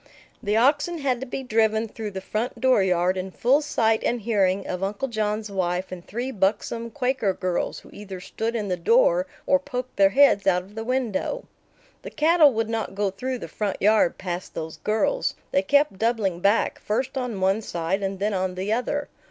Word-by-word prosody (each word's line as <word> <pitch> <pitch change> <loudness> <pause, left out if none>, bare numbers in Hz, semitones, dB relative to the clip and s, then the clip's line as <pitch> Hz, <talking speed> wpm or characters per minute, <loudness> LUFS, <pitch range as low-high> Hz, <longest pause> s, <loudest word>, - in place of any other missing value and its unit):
The 210 +2 0
oxen 290 +8 +2
had 265 -5 0
to 265 - -6
be 265 +2 -4
driven 220 -2 +1
through 215 0 -6
the 190 -1 -6
front 215 +5 -3
dooryard 190 -8 +3
in 185 +1 -3
full 255 +9 +2
sight 225 -7 +1
and 240 -1 0
hearing 200 -3 +1
of 180 0 -4
Uncle 200 +7 -2
John's 215 -2 -2
wife 180 -1 -1
and 180 -2 -7
three 240 +7 -4
buxom 220 +3 -1
Quaker 250 -6 0
girls, 185 -2 -2
who - - -17
either 195 -2 -8
stood 225 +5 -4
in 215 -3 -2
the 180 -2 -1
door - - +3 0.2
or 280 - +4
poked 255 -3 -6
their 195 -1 +6
heads 200 -4 +4
out 180 -1 +3
of 195 +3 -17
the 225 +1 -5
window. 255 - -2 0.6
The - - -7
cattle 315 -1 +5
would 225 -2 -1
not 225 -3 -3
go 200 -1 0
through 255 +6 -3
the - - -7
front 205 -3 -3
yard 210 -3 +3
past 180 -1 -5
those 160 0 -5
girls. 220 - 0 0.2
They 185 - +3
kept 285 -1 +2
doubling 220 -6 0
back, 200 +5 +2
first 255 +6 -2
on 250 -6 -3
one 190 +3 +2
side 175 0 -2
and 195 0 -2
then 205 +2 -1
on 185 -1 -1
the 190 +4 -1
other. 280 +5 -1
215 Hz, 195 wpm, -24 LUFS, 190-255 Hz, 0.6 s, their